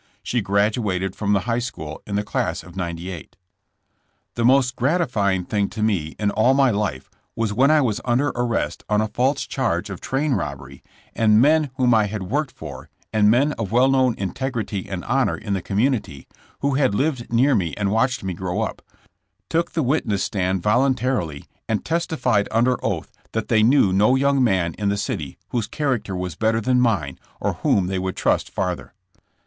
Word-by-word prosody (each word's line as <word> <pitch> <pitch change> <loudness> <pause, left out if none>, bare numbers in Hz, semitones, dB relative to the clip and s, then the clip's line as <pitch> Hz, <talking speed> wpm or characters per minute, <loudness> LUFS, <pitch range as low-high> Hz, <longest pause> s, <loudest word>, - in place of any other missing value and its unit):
She 120 - 0
graduated 100 -2 0
from 105 -1 0
the 100 - +2
High 115 +3 -1
School 80 -11 -6
in 100 - -3
the 105 - 0
class - - -2
of 90 -1 -14
'98. 85 -1 -6 1.0
The 120 - -2
most 130 0 +4
gratifying 120 - +1
thing 100 0 0
to 110 -2 -4
me 90 -8 0
in 105 -1 0
all 120 +6 +3
my 135 -2 +4
life 95 -11 -2 0.3
was 115 -2 -1
when 130 +6 +4
I 155 -1 +5
was 115 -6 0
under 130 +4 +1
arrest 120 -2 -2
on 105 0 +3
a 110 - +1
false 130 +6 0
charge 115 -6 -1
of 95 - -7
train 140 +2 0
robbery 70 - -5 0.3
and 110 -1 +4
men 150 +3 +4
whom 125 -2 +3
I 110 -2 +4
had 105 -1 -4
worked 140 +10 -1
for, - - -9 0.2
and 105 -1 +4
men 135 +7 +3
of 105 -4 -3
well 125 +3 +4
known 130 -3 +3
integrity 105 -1 -3
and 95 -2 -5
honor 135 0 +1
in 105 -1 -4
the 95 - -1
com 100 +3 -4
munity, 110 - 0 0.4
who 140 0 +1
had 130 -7 +2
lived 130 -1 -1
near 130 +5 +4
me 90 - 0
and 100 -1 0
watched 125 +3 +1
me 95 -1 -2
grow 90 +3 -3
up, 110 - -3 0.7
took 165 +1 0
the 160 - 0
witness 120 -7 0
stand 95 -2 -1
voluntarily 120 - +1 0.2
and 110 -2 -1
tes 170 +2 0
tified 105 -10 +1
under 120 +2 +1
oath - - -2 0.2
that 110 -1 -2
they 110 -2 +4
knew 110 -4 +4
no 105 +7 +4
young 140 0 +2
man 95 -7 +1
in 100 -1 +1
the 100 - 0
city 100 - -4
whose 120 -3 -1
character 130 -10 -2
was 90 -1 -3
better 110 0 +1
than 125 +3 +2
mine 90 - 0 0.2
or - - -1
whom 95 - +2
they 95 +1 -2
would 95 0 -3
trust - - +1
farther. 90 -1 -3
110 Hz, 190 wpm, -22 LUFS, 95-130 Hz, 1.0 s, I